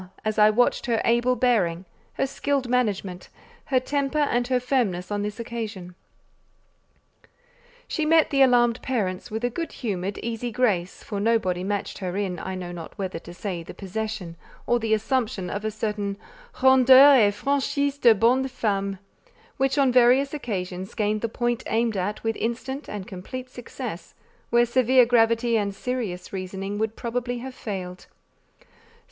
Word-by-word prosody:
as 215 Hz, 0 st, 0 dB
I 210 Hz, 0 st, +7 dB
watched 245 Hz, +4 st, +2 dB
her 230 Hz, -2 st, +1 dB
able 240 Hz, +2 st, +3 dB
bearing, 200 Hz, -8 st, +1 dB, 0.3 s
her -, -, 0 dB
skilled 275 Hz, -1 st, -1 dB
management, 205 Hz, -7 st, -1 dB, 0.4 s
her 260 Hz, -, +2 dB
temper 280 Hz, +2 st, -2 dB
and 245 Hz, -5 st, +1 dB
her 255 Hz, -1 st, +2 dB
firmness 235 Hz, -8 st, -1 dB
on 205 Hz, 0 st, -1 dB
this 210 Hz, +2 st, -4 dB
occasion. 220 Hz, -6 st, -6 dB, 1.9 s
She 315 Hz, -, -2 dB
met 320 Hz, +1 st, +4 dB
the 275 Hz, -1 st, +3 dB
alarmed 245 Hz, -2 st, +4 dB
parents 195 Hz, -8 st, -2 dB
with 220 Hz, +2 st, -4 dB
a 245 Hz, -, 0 dB
good 330 Hz, +7 st, -4 dB
humoured, 200 Hz, -4 st, -3 dB
easy 235 Hz, +1 st, -3 dB
grace 205 Hz, -8 st, 0 dB
for 205 Hz, -, -4 dB
nobody 200 Hz, -5 st, +1 dB
matched 205 Hz, +1 st, -3 dB
her 185 Hz, -1 st, -3 dB
in, 190 Hz, -4 st, -2 dB
I 190 Hz, +3 st, -5 dB
know 180 Hz, -1 st, -6 dB
not 170 Hz, +2 st, -9 dB
whether 190 Hz, -4 st, -4 dB
to 170 Hz, -, -12 dB
say 180 Hz, -1 st, -5 dB
the 165 Hz, -, -10 dB
possession 200 Hz, -3 st, -5 dB, 0.3 s
or 240 Hz, 0 st, +2 dB
the 220 Hz, -1 st, +2 dB
assumption 220 Hz, -5 st, -1 dB
of 205 Hz, -, -4 dB
a 220 Hz, -, 0 dB
certain 210 Hz, -2 st, -3 dB, 0.5 s
"rondeur 265 Hz, -1 st, +8 dB
et -, -, +3 dB
franchise 280 Hz, +2 st, 0 dB
de 235 Hz, -4 st, +6 dB
bonne 250 Hz, +5 st, +3 dB
femme;" 200 Hz, -6 st, -2 dB, 0.6 s
which 270 Hz, +1 st, +1 dB
on 275 Hz, -2 st, +4 dB
various 255 Hz, +3 st, +4 dB
occasions 190 Hz, -7 st, -4 dB
gained 215 Hz, 0 st, 0 dB
the 230 Hz, -, -1 dB
point 240 Hz, +1 st, -1 dB
aimed 225 Hz, 0 st, 0 dB
at 200 Hz, +3 st, -3 dB
with 225 Hz, 0 st, 0 dB
instant 265 Hz, +5 st, -4 dB
and 205 Hz, -3 st, -5 dB
complete 250 Hz, +8 st, -8 dB
success, 235 Hz, -8 st, -8 dB, 0.3 s
where 240 Hz, 0 st, +4 dB
severe 255 Hz, +1 st, +4 dB
gravity 230 Hz, 0 st, +3 dB
and 200 Hz, -1 st, -2 dB
serious 210 Hz, -8 st, -4 dB
reasoning 195 Hz, +2 st, -4 dB
would 220 Hz, 0 st, -1 dB
probably 245 Hz, +1 st, -3 dB
have 260 Hz, +2 st, -7 dB
failed. 185 Hz, -6 st, -6 dB
225 Hz, 160 wpm, -25 LUFS, 195-250 Hz, 1.9 s, rondeur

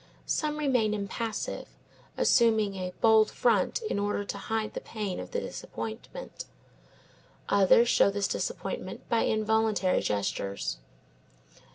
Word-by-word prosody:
Some 300 Hz, -1 st, -1 dB
remain 250 Hz, -8 st, +2 dB
impassive, 215 Hz, +2 st, -4 dB, 0.5 s
assuming 220 Hz, -4 st, +3 dB
a 185 Hz, -1 st, -4 dB
bold 220 Hz, -1 st, +6 dB
front 230 Hz, -, +1 dB
in 430 Hz, -, -1 dB
order 205 Hz, 0 st, -1 dB
to 200 Hz, -, -4 dB
hide 220 Hz, +1 st, -2 dB
the -, -, -5 dB
pain 210 Hz, -4 st, -4 dB
of -, -, -7 dB
the 480 Hz, -, -1 dB
disappointment; 235 Hz, -, -7 dB, 1.0 s
others 200 Hz, +4 st, +5 dB
show 235 Hz, -, +5 dB
this 200 Hz, 0 st, 0 dB
disappointment -, -, -4 dB
by 230 Hz, -, +2 dB
involuntary 215 Hz, -3 st, +2 dB
gestures. 100 Hz, -6 st, -2 dB
215 Hz, 115 wpm, -29 LUFS, 200-230 Hz, 1.0 s, bold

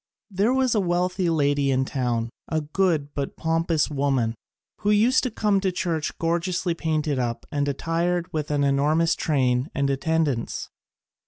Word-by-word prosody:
There 200 Hz, +5 st, +2 dB
was 260 Hz, -2 st, +2 dB
a 215 Hz, -, +2 dB
wealthy 180 Hz, 0 st, 0 dB
lady 145 Hz, -3 st, +2 dB
in 130 Hz, 0 st, +2 dB
town, 120 Hz, -4 st, -1 dB, 0.2 s
a 160 Hz, -1 st, -1 dB
good 155 Hz, -2 st, 0 dB
but 140 Hz, -1 st, -4 dB
pompous 165 Hz, -1 st, +1 dB
woman, 135 Hz, -5 st, 0 dB, 0.5 s
who 205 Hz, -, 0 dB
used 225 Hz, +5 st, +4 dB
to -, -, +1 dB
come 210 Hz, -3 st, +1 dB
to 190 Hz, -, -1 dB
the -, -, +2 dB
church 170 Hz, -4 st, -2 dB
gorgeously 170 Hz, +1 st, 0 dB
painted 155 Hz, -4 st, -1 dB
up 120 Hz, -2 st, -2 dB
and 145 Hz, -1 st, 0 dB
attired 165 Hz, +4 st, -1 dB
with 155 Hz, -2 st, -2 dB
an 145 Hz, -1 st, +1 dB
enormous 150 Hz, +4 st, +2 dB
train 130 Hz, -2 st, +1 dB
and 140 Hz, 0 st, +1 dB
attendants. 145 Hz, -3 st, -1 dB
160 Hz, 160 wpm, -24 LUFS, 140-180 Hz, 0.5 s, used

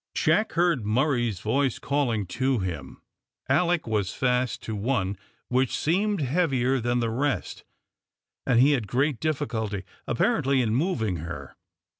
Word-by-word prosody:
Jack 220 Hz, -, +2 dB
heard 170 Hz, -7 st, +2 dB
Murray's 120 Hz, -, +1 dB
voice 130 Hz, +3 st, +1 dB
calling 125 Hz, -8 st, 0 dB
to 130 Hz, +7 st, 0 dB
him. 85 Hz, -, -5 dB, 0.4 s
Alick 170 Hz, +5 st, +2 dB
was 105 Hz, -4 st, -1 dB
fast 125 Hz, -2 st, 0 dB
to 110 Hz, -, -4 dB
one 100 Hz, -3 st, -1 dB, 0.3 s
which 130 Hz, 0 st, +1 dB
seemed 195 Hz, +4 st, +1 dB
heavier 135 Hz, -3 st, +1 dB
than 120 Hz, +1 st, 0 dB
the 115 Hz, -1 st, 0 dB
rest, 140 Hz, +4 st, -2 dB, 0.8 s
and 125 Hz, -3 st, +3 dB
he 135 Hz, +4 st, +6 dB
had 120 Hz, -7 st, 0 dB
great 135 Hz, +2 st, 0 dB
difficulty, 115 Hz, -10 st, -2 dB, 0.2 s
apparently, 140 Hz, -, +2 dB
in 115 Hz, -3 st, +1 dB
moving 115 Hz, -, 0 dB
her. 75 Hz, -4 st, -7 dB
125 Hz, 135 wpm, -26 LUFS, 110-145 Hz, 0.8 s, he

